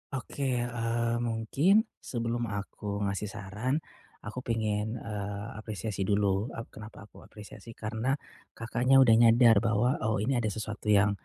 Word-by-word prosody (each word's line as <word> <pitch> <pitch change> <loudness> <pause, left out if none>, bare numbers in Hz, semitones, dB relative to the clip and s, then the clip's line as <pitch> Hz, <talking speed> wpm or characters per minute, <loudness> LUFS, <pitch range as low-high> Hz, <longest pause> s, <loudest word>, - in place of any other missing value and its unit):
Oke, 130 -2 -2
eee, 115 -1 -1
mungkin 120 - +2 0.2
sebelum 120 -1 -2
aku 100 0 -4
ngasih 100 +1 -2
saran, 105 +7 -3 0.5
aku 110 +5 -5
pengen, 110 -2 -1
eee, 105 -2 -5
apresiasi 105 -2 -4
dulu. 100 +1 +1
Eee, 115 - -6
kenapa 110 -1 -11
aku 105 - -16
apresiasi? 110 +2 -12
Karena 110 +5 -1 0.4
Kakaknya 125 +4 +4
udah 115 - +5
nyadar 115 -2 +6
bahwa, 115 +4 +1
oh 110 -1 0
ini 125 0 +1
ada 110 - 0
sesuatu 110 +1 -5
yang, 100 -1 +5
110 Hz, 140 wpm, -29 LUFS, 105-120 Hz, 0.5 s, nyadar